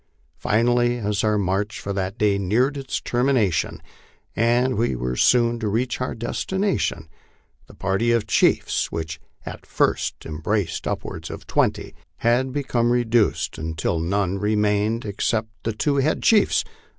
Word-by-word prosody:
Finally, 120 +2 +2
as 105 -2 -1
our 105 -1 +2
march 100 +2 -1
for 100 - -4
that 95 +2 -3
day 100 -2 +2
neared 120 +9 +1
its 135 -2 -3
termination 120 -7 +1 0.6
and 120 +3 +2
we 115 - 0
were 60 +1 -2
soon 120 - +3
to 110 - -2
reach 120 +5 -1
our 125 - -2
destination, 120 - -2 0.6
the - - -15
party 100 +5 0
of 115 -3 +2
chiefs, 105 - +2
which 80 -1 -4 0.3
at - - -8
first - - 0
em 75 -1 -6
braced 100 +3 -1
upwards - - -4
of - - -8
twenty, - - 0 0.2
had 120 +5 +1
become 125 -4 0
reduced 120 -2 +1
until 80 +1 -2
none 95 +3 0
remained 105 +2 +1
except 110 +2 -1
the 115 - -1
two 140 +7 0
head 140 +3 +1
chiefs. 220 -2 +4
110 Hz, 145 wpm, -23 LUFS, 100-120 Hz, 0.6 s, chiefs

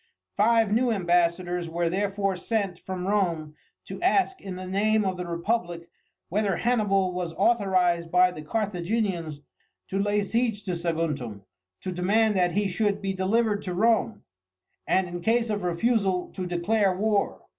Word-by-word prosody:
Five 225 0 +3
new 240 +2 +2
ambassadors 175 -2 +1
were 170 +1 -1
therefore 195 +2 -1
sent 195 -1 -2
from 185 -1 -5
Rome 170 -7 0 0.3
to - - -8
ask 380 +1 +2
in 190 -2 -6
the 185 0 -7
name 210 +3 +1
of 190 -1 0
the 180 -1 -5
republic 170 -1 -2 0.4
whether 200 -1 0
Hannibal 195 -5 +1
was 175 -2 -3
authorized 185 -6 +2
by 180 +1 +4
the 155 - -8
Carthaginians 180 -4 -2 0.5
to 195 - -1
lay 205 0 +1
siege 225 0 -1
to 190 - -3
Saguntum, 155 - -3 0.4
to 185 - -4
demand 205 +5 +2
that 180 -2 +2
he 205 0 +1
should 205 +2 0
be 195 -1 -2
delivered 205 +2 +1
to 180 -2 -4
Rome, 225 +2 +1 0.6
and, 190 -1 +2
in 175 0 -6
case 230 +3 +1
of 205 -1 -2
refusal, 185 +1 0
to 185 -2 -4
declare 185 +2 +1
war. 210 0 0
190 Hz, 155 wpm, -26 LUFS, 175-215 Hz, 0.6 s, by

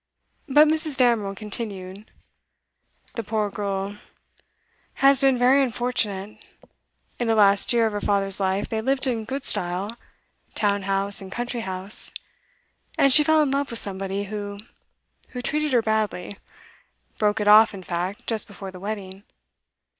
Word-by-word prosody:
But 295 +3 +6
Mrs. 310 -2 0
Damerel 230 -6 +2
continued: 200 -2 -6 1.0
'The 230 - -4
poor 210 -1 -2
girl 200 0 -4 1.0
has 275 0 +4
been 270 -2 +3
very 255 +3 +4
unfortunate. 220 -5 -2 0.8
In 240 - -1
the 225 - +2
last 200 -2 +4
year 235 -2 +3
of 220 - 0
her 205 - -3
father's 195 -1 +1
life 190 0 -1
they 220 -1 -3
lived 265 +3 +1
in 230 -4 -2
good 270 +4 -5
style, 180 +4 0 0.6
town 205 -1 +1
house 195 +1 +1
and 190 -1 -10
country 240 +2 -3
house. 190 0 0 0.8
And 275 -1 +5
she 300 - +8
fell 315 +1 +4
in 280 - -1
love 280 0 -1
with 235 - -4
somebody 195 0 -2
who 205 0 -6 0.8
who - - -3
treated 300 +1 -1
her 240 -3 +3
badly; 215 -3 -2 0.8
broke 210 0 +1
it 210 - -1
off, 215 +1 +7
in 195 -2 -9
fact, 180 +3 -4
just 225 -2 +1
before 195 -2 -9
the 185 - -11
wedding. 195 -1 -6
210 Hz, 150 wpm, -23 LUFS, 195-245 Hz, 1.0 s, she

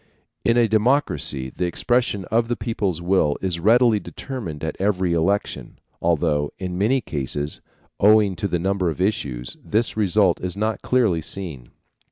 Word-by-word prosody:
In 115 +1 +3
a 120 -1 +4
democracy 110 - +1
the 90 - -1
expression 105 +1 0
of 115 +1 +2
the 120 - -1
people's 100 -9 -2
will 85 -5 +2
is 90 -3 -2
readily 115 +3 +4
determined 100 - -7
at 80 - -3
every 95 -3 +1
election, 95 +5 -1 0.2
although 75 -3 +1
in 90 -1 -4
many 115 +8 +2
cases, 75 - -4 0.4
owing 105 -2 +5
to 100 - -1
the 90 - 0
number 95 0 0
of 80 - -5
issues, 70 - -2
this 110 +3 0
result 100 -3 +2
is 90 +1 -4
not 110 +1 -1
clearly 110 -10 +2
seen. 80 -8 -6
95 Hz, 155 wpm, -22 LUFS, 85-110 Hz, 0.4 s, owing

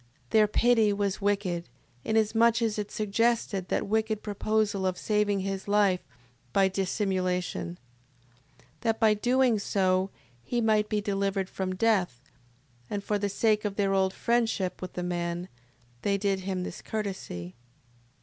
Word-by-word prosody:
Their 215 -1 +5
pity 225 0 +3
was 200 0 -1
wicked, 195 - -1 0.3
inasmuch 225 +1 +3
as 215 -2 0
it 210 - -3
suggested 215 -2 0
that - - 0
wicked 220 0 0
proposal 205 -1 0
of 185 -1 -1
saving 210 -2 +1
his 195 0 -4
life 200 -3 +3 0.5
by 195 -1 +4
dissimulation. 185 - -1 0.8
6:22. - - -26 0.2
That 225 -2 0
by 220 -2 +5
so 210 - -6
doing 205 -7 +2 0.3
he 240 - -2
might 215 -2 +2
be 210 -1 0
delivered 195 -1 -1
from 185 -1 -3
death; 190 - +1 0.7
and 205 -1 -3
for 210 0 0
the 205 0 -1
sake 215 +1 +2
of 205 -2 -2
their 195 -1 +1
old 190 -1 +2
friendship 225 -6 0
with 185 - -6
the 180 - -3
man, 175 0 -3 0.5
they 200 -1 +1
did 200 -1 0
him 185 -1 -3
this - - -6
courtesy. 190 - -5
200 Hz, 145 wpm, -28 LUFS, 190-215 Hz, 0.8 s, Their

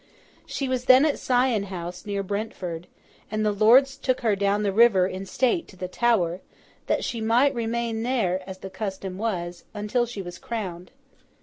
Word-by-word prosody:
She 275 - -3
was 255 -1 -2
then 260 +3 +7
at 300 - 0
Sion 245 -5 +2
House, 180 0 -7
near 200 -1 -2
Brentford; 185 -4 -4 0.4
and 215 0 -1
the 210 - +3
lords 250 +7 +5
took 255 -2 -1
her 220 -4 +2
down 200 +1 +1
the 200 - +1
river 205 -3 +5
in 190 +1 -5
state 260 - +1
to - - -15
the 185 0 -5
Tower, 185 -4 +1 0.5
that - - +1
she 230 - -3
might 240 +6 +3
remain 230 -1 -2
there 225 -7 0
(as 190 - -7
the 190 0 -9
custom 190 -2 -5
was) 175 -6 -3
until 210 +4 0
she 210 -4 -6
was 175 -1 -9
crowned. 185 -6 -5
210 Hz, 180 wpm, -25 LUFS, 185-240 Hz, 0.5 s, then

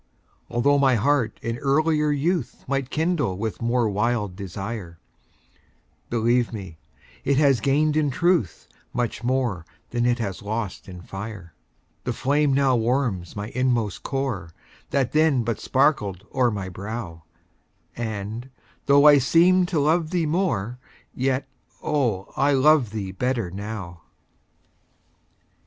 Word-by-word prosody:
Altho' 140 +4 +3
my 135 -2 +4
heart 120 -1 +1
in 115 +1 -3
earlier 150 +2 +2
youth 150 0 -1
Might 135 -1 -1
kindle 155 - 0
with 110 +3 -4
more 120 0 +1
wild 105 -1 0
desire, 95 -1 -6 1.1
Believe 120 +1 +2
me, 95 -8 -8 0.4
it 140 0 +2
has 140 -4 +4
gained 150 +5 +2
in 155 -2 +2
truth 170 - 0 0.3
Much 120 0 -2
more 120 -8 0 0.3
than 120 0 +1
it 120 0 +2
has 100 -6 -4
lost 105 -2 -4
in 90 -1 -9
fire. 95 -4 -8 0.5
The - - -2
flame 145 +2 +1
now 135 -1 +3
warms 115 -7 0
my 105 +1 -4
inmost 120 -5 0
core, 130 - -3 0.4
That 135 -3 0
then 155 -5 +3
but 115 -1 -2
sparkled 105 - +1
o'er 130 -2 +3
my 100 -4 -4
brow, 95 -2 -6 0.7
And, 110 +2 -5 0.4
though 140 +1 +6
I 145 -1 +8
seemed 175 +7 +4
to 170 -4 0
love 155 +2 +2
thee 175 -2 0
more, 125 - -1 0.3
Yet, 130 +1 -1 0.4
oh, 120 -11 -1
I 140 +2 +3
love 140 -2 +4
thee 100 -3 -4
better 115 -2 -1
now. 100 -4 -6
120 Hz, 130 wpm, -24 LUFS, 105-140 Hz, 1.1 s, I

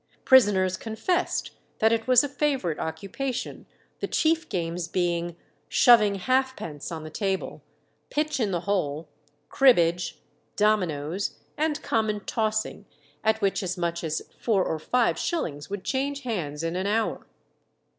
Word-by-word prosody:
Prisoners 195 -7 +5
confessed 225 - -1 0.3
that 220 +1 +3
it 225 0 0
was 255 0 +6
a - - 0
favourite 275 - -1
occupation, 220 +10 -4 0.3
the - - -2
chief 325 +1 +1
games 170 -4 -2
being 175 -1 -1 0.3
"shoving 215 -5 +6
halfpence" 255 - -1
on 160 -2 -5
the 155 - -8
table, 195 +2 -2 0.5
pitch 300 -1 -1
in 220 -4 +1
the 175 -3 -1
hole, 165 -6 -1 0.4
cribbage, 175 - +3 0.4
dominoes, 185 -4 0 0.2
and 305 0 -1
common 215 -2 0
tossing, 220 -1 -2 0.4
at 220 0 +2
which 195 +1 +1
as 185 -2 -3
much 170 -1 -2
as 155 -1 -2 0.2
four 200 -6 +2
or 160 - -2
five 245 +9 +1
shillings 155 - -3
would 200 -1 -5
change 280 +1 -1
hands 165 - -3
in 165 +1 -2
an 185 +2 -1
hour. 220 +2 -1
205 Hz, 135 wpm, -26 LUFS, 170-245 Hz, 0.5 s, was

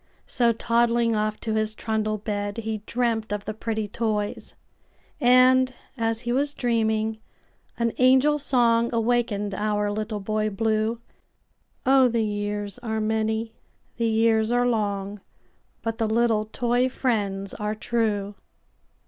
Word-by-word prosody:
So, 240 -2 +2
toddling 230 0 +1
off 215 0 -1
to 220 - -2
his 215 0 -1
trundle 215 -1 -1
bed, 205 0 -3
He 220 -1 -3
dreamt 230 -3 -1
of 205 -1 -3
the 215 - -3
pretty 220 -1 -3
toys; 210 -1 -3 0.6
And, 255 +1 +5 0.2
as 225 -2 -1
he 240 -1 -3
was 285 +3 0
dreaming, 220 -2 0 0.6
an 235 -1 0
angel 265 +4 +5
songAwakened 235 -4 +1
our 210 +1 0
Little 215 0 -3
Boy 215 +1 -1
Blue—Oh! 225 +4 -1
the 230 -2 0
years 205 +1 -3
are 220 -3 -3
many, 220 +1 -1 0.4
the 230 -1 +1
years 220 0 +2
are 245 0 +2
long, 205 -3 -1 0.6
But 225 +1 -3
the 225 - +1
little 220 -1 +2
toy 245 +3 0
friends 200 -6 -2
are 210 0 -3
true! 215 -3 -1
220 Hz, 125 wpm, -25 LUFS, 215-235 Hz, 0.6 s, And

